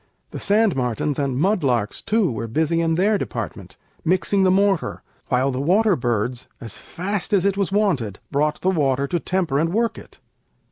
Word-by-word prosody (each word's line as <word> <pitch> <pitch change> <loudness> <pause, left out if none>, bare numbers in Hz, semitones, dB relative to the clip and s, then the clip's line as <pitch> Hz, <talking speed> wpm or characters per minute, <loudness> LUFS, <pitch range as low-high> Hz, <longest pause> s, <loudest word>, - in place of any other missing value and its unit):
The - - -6
sand 210 -2 +2
martens 130 +3 -1
And 135 -3 -1
mud 190 +4 +1
larks, 120 -6 0
too, 215 - +1
were 115 0 -4
busy 160 +7 +1
in 165 -1 +1
their 200 +4 +2
department, - - -6 0.3
Mixing 185 +3 +2
the 190 - +4
mortar, 195 -1 +1 0.2
while 130 +2 +1
the 130 +1 -2
water 195 +6 +3
birds, 120 -1 -2
As 115 -3 -7
fast 200 +4 -4
as 195 -2 +3
it 200 -1 +2
was 200 -1 -1
wanted, 170 - 0
brought 150 +2 0
the 190 - +2
water 140 -5 +1
To 170 +5 -1
temper 175 -6 0
and 165 +2 +1
work 230 +3 0
it. - - -16
165 Hz, 185 wpm, -22 LUFS, 130-195 Hz, 0.3 s, the